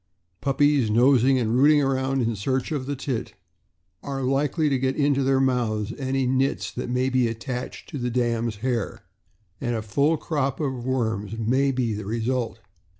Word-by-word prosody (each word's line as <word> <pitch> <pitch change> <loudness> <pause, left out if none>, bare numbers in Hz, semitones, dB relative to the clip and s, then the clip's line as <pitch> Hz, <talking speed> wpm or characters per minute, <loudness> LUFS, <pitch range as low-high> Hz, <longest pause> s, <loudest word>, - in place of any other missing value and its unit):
Puppies 140 -3 +2
nosing 130 +3 +4
and 115 -2 0
rooting 150 +2 +6
around 135 -1 +1
in 115 0 0
search 130 +7 -1
of 140 -4 -2
the 145 - -2
teat 125 -5 -4 0.7
are 135 -1 -4
likely 140 +4 +1
to 135 -3 +1
get 130 +1 0
into 140 -2 +2
their 135 0 +2
mouths 120 -6 0
any 135 -1 -1
nits 130 +2 0
that - - -5
may 125 +1 +1
be 130 -2 +2
attached 125 +2 -5
to 145 - -5
the 125 0 -1
dam' 120 -1 0
s 110 - -4
hair, 120 -6 -2 0.6
and 120 -3 -1
a 110 - -3
full 140 +10 +2
crop 140 -4 -2
of 130 -5 -2
worms 110 -5 -1
may 130 +5 +2
be 125 -4 -1
the 105 -1 -5
result. 115 +1 -2
130 Hz, 175 wpm, -24 LUFS, 115-135 Hz, 0.7 s, rooting